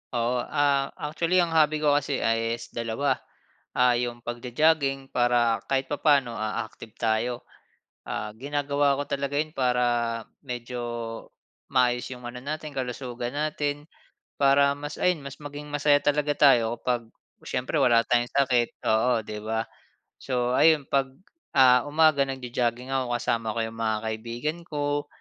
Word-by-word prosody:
Oo, 120 +1 +1
ah, 140 0 +1
actually, 165 +2 -1
ang 165 - -2
hobby 155 -1 +3
ko 150 - +4
kasi 145 -1 0
ay 115 0 +1
is - - -11
dalawa. 115 +4 -1 0.6
Ah, 125 -1 +4
yung 120 -1 -4
pagjo-jogging 135 +3 0
para 120 -2 +2
kahit 135 0 -1
papaano, 140 -4 +3
ah, 110 +1 -2
active 110 0 -13
tayo. 115 +2 -1 0.6
Ah, 105 0 -5
ginagawa 140 +2 0
ko 145 - -2
talaga 140 0 -2
yun 155 +1 -1
para 120 -3 0 0.2
medyo 125 -2 -5 0.9
maayos 125 -2 +2
yung 125 -1 -9
ano 120 +1 -7
natin 150 +2 -5
kalusugan 125 -2 -4
natin 150 -1 -2 0.5
para 140 0 +5
mas 145 +1 -6
ayun 180 -3 +2
mas 140 0 -7
maging 145 0 -8
masaya 145 0 +3
talaga 145 0 +1
tayo 120 -5 +4
kapag 125 -2 0 0.4
siyempre 125 +4 -3
wala 115 -2 +4
tayong 120 0 +2
sakit, 125 -4 +2 0.2
oo, 110 +3 +3
'di 105 - -6
ba? 110 +1 -1 0.6
So, 125 -2 -1
ayun 155 -2 +5
'pag, 135 -1 +2 0.5
ah, 125 -2 +6
umaga, 155 -2 +4
nagjo-jogging 125 -1 -2
ako, 130 -2 0
kasama 115 -2 -1
ko - - -1
yung 115 0 -8
mga 110 -1 +1
kaibigan 120 +9 -4
ko, 145 -1 -2
130 Hz, 145 wpm, -26 LUFS, 120-145 Hz, 0.9 s, ah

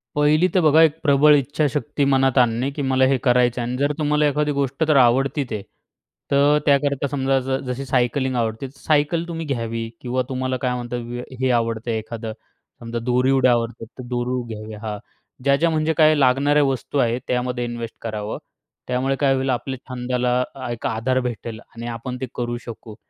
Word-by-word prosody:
पहिली 150 +4 +4
तर 185 - +3
बघा, 155 0 +5
एक 160 -2 +4
प्रबळ 150 0 +6
इच्छाशक्ती 145 +1 0
मनात 135 0 +2
आणणे, 120 +1 +3
की 145 - -5
मला 130 -1 +3
हे 135 0 +2
करायचं 125 -1 +3
आहे 120 - -3
आणि 125 - -3
जर 145 +2 +1
तुम्हाला 150 0 +2
एखादी 150 +1 0
गोष्ट 140 +1 -1
जर 155 - +3
आवडते 135 +2 +2
आहे. 105 -2 -3 0.7
तर 140 +1 +4
त्याकरता 140 -1 +2
समजा, 135 -1 +1 0.3
जशी 125 +2 -3
सायकलिंग 130 +1 0
आवडते, 115 +2 -2
सायकल 150 +3 +1
तुम्ही 165 -1 -5
घ्यावी 115 -4 -3
किंवा 130 +1 -1
तुम्हाला 130 0 -2
काय 125 -1 0
म्हणतात, 120 0 -4 0.4
हे 130 - +2
आवडते, 115 -1 0
एखादं 110 0 -6 0.5
समजा 115 0 -4
दोरी 125 +2 +2
उडया 130 -2 +4
आवडतात, 115 -1 -1
तर - - -5
दोरी 125 +1 -1
घ्यावी. 110 0 -8
हां, 105 -1 -4 0.5
ज्या-ज्या 140 +4 +3
म्हणजे 160 0 +1
काय 155 -1 +6
लागणाऱ्या 145 +2 +3
वस्तू 135 0 -2
आहेत, 120 0 +1
त्यामध्ये 125 0 -1
इन्वेस्ट 120 -1 -6
करावं. 110 -2 -4 0.5
त्यामुळे 130 +2 0
काय 140 -2 +3
होईल, 135 0 -1
आपल्या 130 +1 -2
छंदाला 125 0 0 0.3
एक 120 - -6
आधार 125 +4 0
भेटेल 115 -1 -7
आणि 115 0 -10
आपण 120 +2 -5
ते - - -1
करू 120 0 -2
शकू. 115 -2 -9
130 Hz, 175 wpm, -22 LUFS, 120-140 Hz, 0.7 s, प्रबळ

